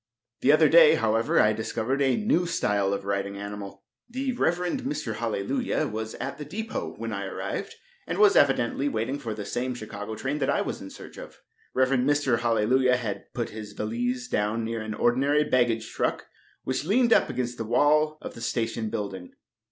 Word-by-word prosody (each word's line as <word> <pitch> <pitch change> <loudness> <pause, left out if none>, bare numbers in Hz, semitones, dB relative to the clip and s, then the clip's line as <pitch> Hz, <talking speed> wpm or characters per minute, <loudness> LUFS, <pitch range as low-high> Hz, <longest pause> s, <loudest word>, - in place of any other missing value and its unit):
The - - +4
other - - +6
day, 485 -2 +7
however, 115 +1 +2
I 110 - +5
discovered 115 +4 -2
a 135 -2 +3
new 180 -5 +1
style 100 - +1
of 100 -1 -3
riding 100 0 -2
animal. 100 -1 -7 0.3
The 260 +2 -2
Rev. 175 -8 +1 0.2
Mr. 275 +3 -3
Hallelujah 255 - -1
was 110 -3 -4
at - - -5
the - - -4
depot 190 - -5
when 115 0 -4
I 100 -1 -3
arrived, - - -5 0.3
and 170 - -2
was 210 0 +6
evidently 135 0 +3
waiting 115 +4 -2
for 115 -6 -4
the 105 -1 -6
same 125 +4 -2
Chicago 110 -1 -6
train 140 +6 -3
that 135 - 0
I - - +2
was - - -4
in - - -8
search - - -11
of. - - -10 0.4
Rev. 130 0 +3
Mr. 135 -2 +2
Hallelujah 120 +2 +3
had 110 -5 -5
put 120 -2 -2
his 105 -1 -8
valise 120 +4 -2
down 105 +1 0
near 115 0 -3
an 110 0 -5
ordinary 140 +6 +2
baggage 120 -5 +1
truck - - -1 0.4
which 130 +1 -2
leaned 230 +7 +3
up - - +3
against 120 -1 -3
the - - -1
wall 150 +6 +3
of - - -6
the 115 - -10
station 115 -1 -2
building. 100 -5 -5
120 Hz, 185 wpm, -26 LUFS, 110-145 Hz, 0.4 s, day